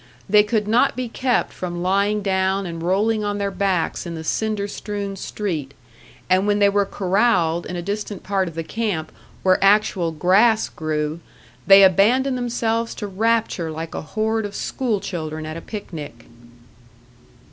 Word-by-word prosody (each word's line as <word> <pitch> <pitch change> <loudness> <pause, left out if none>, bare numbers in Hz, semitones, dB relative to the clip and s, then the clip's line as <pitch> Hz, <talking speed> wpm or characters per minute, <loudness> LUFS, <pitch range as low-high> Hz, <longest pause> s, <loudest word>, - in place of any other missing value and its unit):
They 210 +1 +6
could 210 0 -1
not 245 +6 +3
be 255 -1 -3
kept 245 +1 0
from 175 -1 -5
lying 200 +3 +1
down 190 0 0
and 165 -2 -6
rolling 210 +5 +1
on 205 0 -2
their 200 -1 -1
backs 185 -2 -1
in 170 - -5
the 160 - -6
cinder 210 +4 -1
strewn 200 -1 -5
street; 170 -8 -4 0.5
and 185 +2 +2
when 205 0 +2
they 200 -1 +4
were 200 0 +1
corralled 185 -4 +1
in 180 - -5
a 175 - -4
distant 205 0 -4
part 195 -1 0
of 165 - -8
the 165 - -3
camp 180 -4 -3 0.3
where 185 0 +3
actual 195 -4 +3
grass 200 +8 +3
grew, 155 0 -3 0.5
they 195 0 +9
abandoned 235 +8 +4
themselves 230 -2 -1
to 210 - -5
rapture 210 -3 0
like 160 +1 -6
a - - -4
horde 220 +6 -1
of 200 - -12
school 235 -6 -1
children 155 -5 -5
at 155 0 -6
a 165 - -6
picnic. 155 - -8
195 Hz, 165 wpm, -21 LUFS, 175-215 Hz, 0.5 s, they